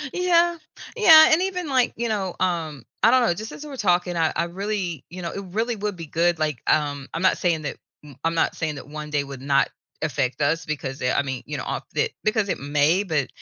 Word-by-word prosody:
Yeah, 345 -1 +3 0.4
yeah, 325 -9 +8
and 320 +3 +4
even 365 -3 -2
like, 255 -3 +2
you 235 +1 -2
know, 195 -5 -2
um, 165 -7 -1 0.2
I 225 - +6
dunno, 245 -5 +4
just 215 +5 -7
as 300 - -9
we're 280 -2 -8
talking, 180 -4 +1
I 160 -2 +2
I - - +1
really, 180 -3 -3
you 180 +1 -8
know, 170 - -3
it 200 - -6
really 230 +3 0
would 210 -1 -3
be 165 -2 -7
good, 170 +2 +1
like, 150 -5 -1
um 145 -3 +1
I'm 165 - -2
not - - +4
saying 165 -3 0
that 145 - -4 0.3
m 145 -3 -13
I'm 165 +1 0
not 165 - +1
saying 155 -2 -2
that 140 - -9
1 150 +1 -7
day 145 -1 0
would 140 -2 -9
not 140 0 +2 0.3
affect 135 -3 -1
us 160 +3 +1
because 140 -3 -4
i 125 - +1
I - - +2
mean, 130 -3 -4
you - - -4
know, - - -4
ob - - -3
tha - - +1
because 215 -1 +1
it - - -1
may, 145 +6 +2
but 155 -8 -1
170 Hz, 235 wpm, -23 LUFS, 150-215 Hz, 0.4 s, yeah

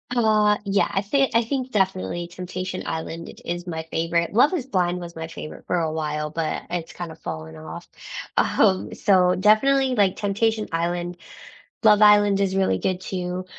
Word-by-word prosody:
Uh, 215 -3 +3
yeah, 200 0 +2
I 195 - +1
thi 270 +7 +1
I 230 0 +4
think 260 +1 -3
definitely 185 -3 -1
Temptation 185 +1 -5
Island 165 +1 -6
is 175 +1 -4
my 160 -2 -4
favorite 170 +2 0
Love 270 - +4
is 270 -7 -2
Blind 180 -5 0
was 170 -1 -9
my 160 0 -5
favorite 155 -1 -9
for 180 - 0
a 160 -2 -1
while, 150 -1 -2
but 160 +1 -2
it's 175 -2 -4
kind 175 -2 -6
of - - -13
fallen 80 0 -7
off, 80 +1 -9 0.5
um, 95 +3 +2
so 180 -3 +3
definitely, 255 +6 +3
like, 195 -3 +3
Temptation 215 +1 0
Island. 175 +1 -2 0.7
Love 210 -1 +6
Island 205 -1 +6
is 190 -1 0
really 190 - +2
good, 185 - -1
too, 180 -1 -4
185 Hz, 170 wpm, -23 LUFS, 165-210 Hz, 0.7 s, Love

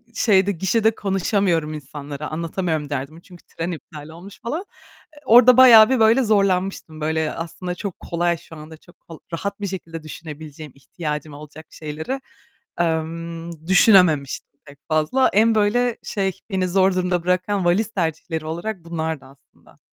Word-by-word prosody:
şeyde, 200 -3 +3
gişede 200 +5 +1
konuşamıyorum 190 -5 0
insanlara, 145 0 -7
anlatamıyorum 160 -2 -3
derdimi. 145 +4 -5
Çünkü 175 -2 -16
tren 170 +2 -5
iptal 155 -2 -9
olmuş 175 +5 -12
falan. 275 +8 -3 0.5
E - - -20
orada 245 +2 +7
bayağı 235 -4 +9
bir 260 - +2
böyle 225 +4 +5
zorlanmıştım, 195 -6 0
böyle, 155 0 -1
aslında 170 +2 -5
çok 195 0 -6
kolay, 170 0 -1
şu 160 - -14
anda 155 +1 -11
çok 175 +2 -21 0.4
rahat 200 +4 -4
bir 200 - -2
şekilde 165 -4 -7
düşünebileceğim, 155 -1 -9
ihtiyacım 150 +1 -6
olacak 150 +2 -11
şeyleri, 160 - -6 0.6
emm, 165 0 -3
düşünememiştim 175 - +3
pek 140 -1 -15
fazla. 155 +12 +2
En 225 +2 +4
böyle, 230 +3 +1
şey, 195 -3 -3
beni 185 -2 0
zor 190 +1 +3
durumda 180 -1 0
bırakan 185 +2 0
valiz 190 +5 +2
tercihleri 160 -4 -3
olarak 170 +3 -5
bunlardı 160 -3 -4
aslında. 135 +1 -22
170 Hz, 140 wpm, -21 LUFS, 155-195 Hz, 0.6 s, bayağı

